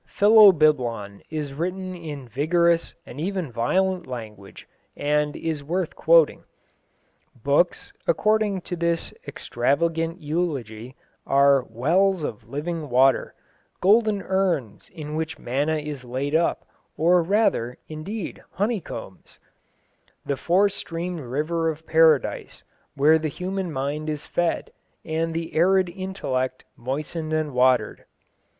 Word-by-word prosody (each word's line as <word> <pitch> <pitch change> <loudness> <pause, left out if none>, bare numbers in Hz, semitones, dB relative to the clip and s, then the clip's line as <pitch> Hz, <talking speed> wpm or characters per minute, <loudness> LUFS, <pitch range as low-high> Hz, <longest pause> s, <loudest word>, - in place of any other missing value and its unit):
Philobiblon 155 - +4
is 150 -3 -4
written 185 +4 -3
in 150 -7 -8
vigorous 165 +7 +1
and 140 - -8
even 180 -5 -3
violent 180 +10 0
language, 110 -6 -9 0.3
and 150 0 0
is 160 -3 -3
worth 175 +3 -2
quoting. - - +4 1.0
Books, - - +1
according 215 - +2
to 180 - -5
this 170 -1 -1
extravagant 165 +7 -1
eulogy, 135 -8 -3 0.3
are 140 0 +5
"wells 170 - +2
of 110 -7 -6
living 155 +1 -4
water," 130 +2 +3 0.4
"golden 210 0 +3
urns 180 - -1
in 150 -3 -8
which 160 0 -3
manna 145 +6 -1
is 150 -3 -6
laid 130 +4 -3
up, 165 +1 +1 0.3
or 175 +3 +4
rather, 165 - +1
indeed, 165 +6 -6
honeycombs," 200 - -4 0.9
"the 140 - -1
four 180 +9 +3
streamed 175 -2 -5
river 155 +5 -1
of 160 0 -6
Paradise, 160 -5 +2 0.3
where 155 +3 +5
the 155 - -2
human 185 +3 -4
mind 145 +2 -3
is 150 -1 -4
fed, 175 -1 -1 0.3
and 165 +1 -2
the 165 0 -4
arid 185 +2 +3
intellect 150 -9 -3
moistened 155 +5 -4
and 155 -2 -1
watered." 125 0 +2
160 Hz, 115 wpm, -24 LUFS, 140-180 Hz, 1.0 s, are